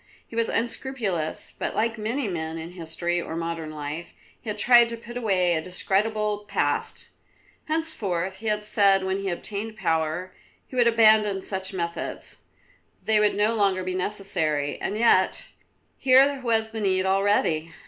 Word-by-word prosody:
He - - -11
was 230 0 +1
unscrupulous, 230 -9 -3
but - - -3
like 230 0 0
many 230 +4 -1
men 160 -3 -4
in 165 +1 -7
history 175 0 -3
or 160 - -6
modern 165 -1 -4
life, 155 +2 -6 0.3
he 225 - -7
had 210 - -3
tried 240 +2 +6
to 230 - -5
put 235 +1 -11
away 190 -7 +2
a 160 - 0
discreditable 210 +4 -1
past. - - -1 0.6
Henceforth, 200 - -2
he 220 +3 -7
had 210 0 0
said 200 -2 +3
when 190 +1 -1
he 195 -1 -2
obtained 210 +4 -4
power, 165 0 -1 0.3
he - - -12
would 240 -2 +4
abandon 215 -4 +4
such 190 -1 -3
methods: 170 -3 -5 0.7
they 220 -1 +3
would 210 0 +3
no 210 +2 +2
longer 195 -4 +1
be 185 0 -3
necessary; 180 -7 -2
and 210 - -2
yet, 230 +1 +3 0.5
here 270 +1 +5
was 225 -2 0
the 220 -1 -4
need 190 -2 +1
already. 190 -5 +1
200 Hz, 160 wpm, -25 LUFS, 175-225 Hz, 0.7 s, tried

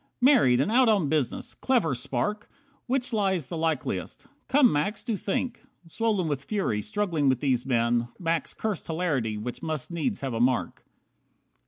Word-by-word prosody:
Married, 245 - +5
and 165 +10 +1
out 250 0 +5
on 195 -9 +2
business. 150 -6 -1
Clever 235 - +1
Spark! 125 - -2 0.4
Which 255 -1 0
lie's 190 - 0
the - - -4
likeliest? 160 -3 -2 0.2
Come, 275 -3 +5
Max, 150 +9 -1
do 230 -3 -1
think." 235 +5 -2 0.2
Swollen 205 0 0
with 140 -3 -2
fury, 190 - -1
struggling 180 - 0
with 130 -2 +2
these 130 -3 0
men, 120 -1 +2
Max 165 -2 -1
cursed 215 -5 -3
hilarity 150 -10 -1
which 120 +3 -5
must 155 -1 -4
needs 170 +7 -2
have 135 -3 -3
a 115 - -2
mark. 120 -8 0
165 Hz, 160 wpm, -27 LUFS, 130-210 Hz, 0.4 s, Married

